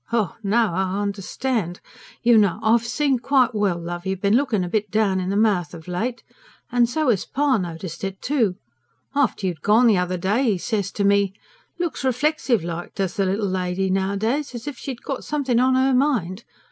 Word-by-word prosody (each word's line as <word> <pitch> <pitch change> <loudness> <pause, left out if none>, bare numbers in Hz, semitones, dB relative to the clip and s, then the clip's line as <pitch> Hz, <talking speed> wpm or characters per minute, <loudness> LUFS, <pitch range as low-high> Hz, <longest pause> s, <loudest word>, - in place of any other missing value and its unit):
"Ha! 225 -6 0
Now 220 -1 +2
I 190 +2 -1
understand. 200 -1 -2 0.4
You 240 0 +5
know 205 -3 +3
I've 230 +1 +3
seen 270 +1 +1
quite 255 -1 +2
well, 205 -5 +1
love, 175 0 -5
you've 190 -1 -2
been 200 +2 +2
looking 245 -7 +1
a - - -3
bit 210 +2 -1
down 200 -2 +1
in 185 0 -2
the 200 - -1
mouth 195 -7 +1
of 160 0 -12
late. 225 +8 -3 0.5
And 240 -1 +3
so 305 +2 0
'as 200 -5 +2
pa 275 -4 +1
noticed 170 0 -6
it, 195 0 -4
too. 235 -10 +1 0.6
After 275 -8 +1
you'd 175 -4 -3
gone 220 +4 +4
the 215 -6 +5
other 180 0 -1
day, 210 +6 +1
'e - - -2
said 205 +2 -1
to 200 +2 -3
me: 200 -1 +2 0.4
'Looks 345 -5 -3
reflexive 260 - +1
like 170 0 -6
does 190 -3 -1
the 195 -2 0
little 200 +3 0
lady 185 0 -1
nowadays; 215 +9 -1
as 235 - -7
if 290 - -4
she'd 255 0 -7
got 275 - -4
something 270 -5 0
on 260 +1 +3
'er 265 0 +3
mind.' 235 - 0
210 Hz, 195 wpm, -22 LUFS, 190-250 Hz, 0.6 s, You